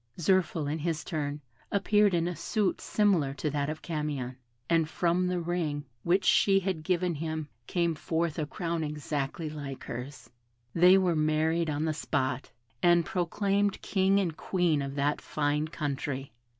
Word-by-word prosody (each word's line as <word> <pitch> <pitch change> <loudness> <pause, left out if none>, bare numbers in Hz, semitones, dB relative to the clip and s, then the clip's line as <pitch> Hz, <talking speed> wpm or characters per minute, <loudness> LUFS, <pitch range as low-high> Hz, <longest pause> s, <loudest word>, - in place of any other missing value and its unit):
Zirphil, 175 -2 +2
in 150 +3 -2
his 160 -1 -2
turn, 150 -3 -3 0.3
appeared 205 -1 +3
in 170 0 +1
a 175 - -3
suit 205 +5 -1
similar 180 -10 +2
to 145 +2 -2
that 145 0 -1
of 155 0 -5
Camion; 150 -6 -3 0.3
and 165 -2 +2
from 175 +2 +1
the 180 0 0
ring 165 -4 -2 0.2
which 185 +6 +2
she 195 -1 +5
had 185 -4 -2
given 180 +1 0
him 155 0 -3 0.2
came 170 -2 +1
forth 160 0 -1
a 150 - -1
crown 170 0 -2
exactly 150 0 -3
like 145 -3 -6
hers. 125 +4 -7 0.5
They 180 +3 +7
were 180 -3 +2
married 155 +2 +1
on 150 +1 -1
the 160 - 0
spot, 130 -3 -2 0.3
and 175 -1 +5
proclaimed 200 +3 0
King 195 0 +3
and 175 -5 -1
Queen 175 -6 +1
of 140 0 -4
that 145 +1 0
fine 150 0 0
country. 140 -4 -4
160 Hz, 160 wpm, -29 LUFS, 145-180 Hz, 0.5 s, They